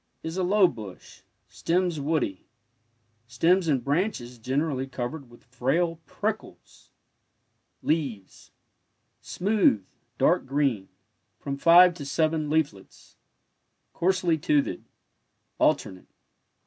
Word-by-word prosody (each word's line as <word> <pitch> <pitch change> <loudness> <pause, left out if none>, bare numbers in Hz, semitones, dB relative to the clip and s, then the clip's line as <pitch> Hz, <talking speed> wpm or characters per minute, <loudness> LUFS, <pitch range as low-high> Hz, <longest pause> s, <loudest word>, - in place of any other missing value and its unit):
Is 160 +1 -5
a 190 - -1
low 190 +1 +4
bush— 105 - -10 0.3
stems 175 -2 -1
woody— 140 - -2 0.8
stems 165 +9 +2
and 135 -6 +1
branches 140 - -2
generally 135 +2 -1
covered 130 +2 -6
with 120 - -18
frail 140 +8 -1
prickles. - - -6 0.9
Leaves 135 - -3 0.4
— - - -48
smooth, 190 - +2 0.3
dark - - +2
green, 135 -8 0 0.5
from 140 - -5
five 175 +5 +7
to 155 -4 -8
seven 155 +1 0
leaflets, 145 -11 -3 0.8
coarsely 180 -2 +1
toothed— 150 -2 0 0.7
alternate. 95 -1 0
150 Hz, 95 wpm, -26 LUFS, 125-170 Hz, 0.9 s, five